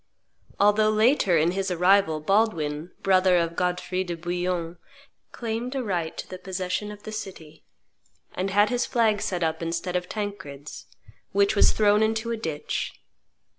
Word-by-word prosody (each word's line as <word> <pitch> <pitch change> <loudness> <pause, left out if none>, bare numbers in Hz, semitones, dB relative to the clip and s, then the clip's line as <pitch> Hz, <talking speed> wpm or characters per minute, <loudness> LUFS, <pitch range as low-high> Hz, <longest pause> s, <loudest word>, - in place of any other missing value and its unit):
Although 210 +1 +4
later 215 - +3
in 160 +2 +3
his 195 +1 -2
arrival, 180 -3 +3
Baldwin, 165 -5 0
brother 185 -1 +4
of 170 -1 0
Godfrey 180 +1 -1
de 175 -2 -5
Bouillon, 175 0 -3 0.5
claimed 235 +3 -4
a 265 - -1
right 175 -7 -2
to - - -6
the 185 - -8
possession 190 +2 -3
of 205 0 -11
the 215 - -7
city, 185 -7 -8 0.7
and 190 +2 -2
had 205 +2 +3
his 245 -1 0
flag 220 -4 +2
set 180 -2 -2
up 160 0 -1
instead 170 +2 -3
of 180 0 -2
Tancred's, 190 -10 -6 0.5
which 200 +2 +3
was - - +5
thrown 210 0 +3
into 220 +1 0
a - - 0
ditch. 160 -8 -4
185 Hz, 155 wpm, -25 LUFS, 170-210 Hz, 0.7 s, was